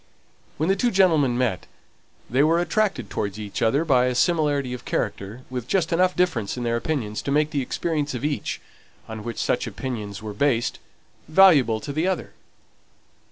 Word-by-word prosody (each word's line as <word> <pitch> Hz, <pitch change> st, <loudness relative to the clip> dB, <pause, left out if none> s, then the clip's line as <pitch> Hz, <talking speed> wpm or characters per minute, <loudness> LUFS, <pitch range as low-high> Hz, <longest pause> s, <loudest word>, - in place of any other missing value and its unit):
When 155 Hz, -, 0 dB
the 195 Hz, -, +3 dB
two 240 Hz, +5 st, +1 dB
gentlemen 160 Hz, -, +3 dB
met 120 Hz, -8 st, -1 dB, 0.6 s
they 130 Hz, +5 st, +2 dB
were 165 Hz, +2 st, +3 dB
attracted 190 Hz, -, 0 dB
towards 100 Hz, 0 st, -3 dB
each 105 Hz, -2 st, -5 dB
other 140 Hz, +8 st, +2 dB
by 130 Hz, -5 st, +4 dB
a 125 Hz, -, -1 dB
similarity 145 Hz, -3 st, +1 dB
of 125 Hz, -, -7 dB
character, 105 Hz, +6 st, -3 dB
with 125 Hz, -2 st, -4 dB
just 170 Hz, -1 st, +1 dB
enough 180 Hz, +2 st, +2 dB
difference 130 Hz, -, 0 dB
in 125 Hz, -, -3 dB
their 115 Hz, 0 st, 0 dB
opinions 115 Hz, -5 st, -2 dB
to -, -, -5 dB
make 150 Hz, +2 st, +2 dB
the 145 Hz, -3 st, 0 dB
experience 150 Hz, +1 st, -2 dB
of 125 Hz, -, -3 dB
each, 150 Hz, -1 st, -2 dB, 0.5 s
on 110 Hz, -1 st, -7 dB
which 115 Hz, 0 st, -5 dB
such -, -, 0 dB
opinions 105 Hz, -7 st, -5 dB
were 110 Hz, -1 st, -6 dB
based, 120 Hz, +1 st, 0 dB, 0.5 s
valuable 155 Hz, -, +5 dB
to 140 Hz, -, -5 dB
the 160 Hz, +5 st, 0 dB
other. 190 Hz, -, -2 dB
135 Hz, 175 wpm, -24 LUFS, 115-160 Hz, 0.6 s, valuable